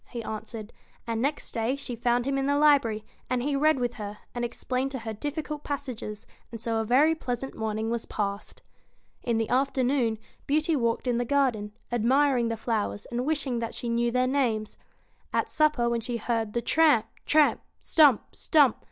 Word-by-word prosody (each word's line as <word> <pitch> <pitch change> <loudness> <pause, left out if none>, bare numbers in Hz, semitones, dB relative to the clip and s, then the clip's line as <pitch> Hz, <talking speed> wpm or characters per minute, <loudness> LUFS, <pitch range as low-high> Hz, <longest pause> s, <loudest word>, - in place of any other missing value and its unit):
he 235 -2 -5
answered; 220 0 -6 0.3
and 230 -1 -2
next 285 +3 -1
day 230 +3 0
she 265 -3 -6
found 240 +1 +1
him 275 0 0
in 275 0 0
the 285 0 +2
library, 270 -8 +3 0.2
and 250 -1 0
he 285 +1 0
read 305 +1 +3
with 245 -1 -1
her, 210 -2 -7 0.2
and 240 - -3
explained 255 +2 -2
to 270 - -4
her 225 -2 -5
difficult 295 +5 -4
passages, 255 -7 -5 0.3
and 230 - -7
so 230 0 -1
a 225 - +1
very 275 +8 +4
pleasant 265 -4 -4
morning 220 0 -2
was 235 -1 -2
passed. 200 0 -4 0.6
In 235 -2 0
the 225 -1 0
afternoon, 260 -3 +1 0.3
Beauty 310 +3 +2
walked 235 -3 0
in 245 -1 +1
the - - +1
garden, 240 -6 0 0.2
admiring 245 +1 +3
the 230 0 -2
flowers, 215 -2 -2
and 245 +3 -2
wishing 280 -6 0
that 230 0 -4
she 240 - -4
knew 235 +1 +1
their 250 +1 +2
names. 245 -5 0 0.6
At - - 0
supper, 300 -6 +2
when 235 -1 0
she 240 +1 -3
heard 225 -2 -2
the 235 - -1
tramp, 300 -5 +4 0.2
tramp! 305 -1 +4 0.2
stump, 290 -8 +4
stump 290 -7 +4
240 Hz, 185 wpm, -27 LUFS, 225-280 Hz, 0.6 s, very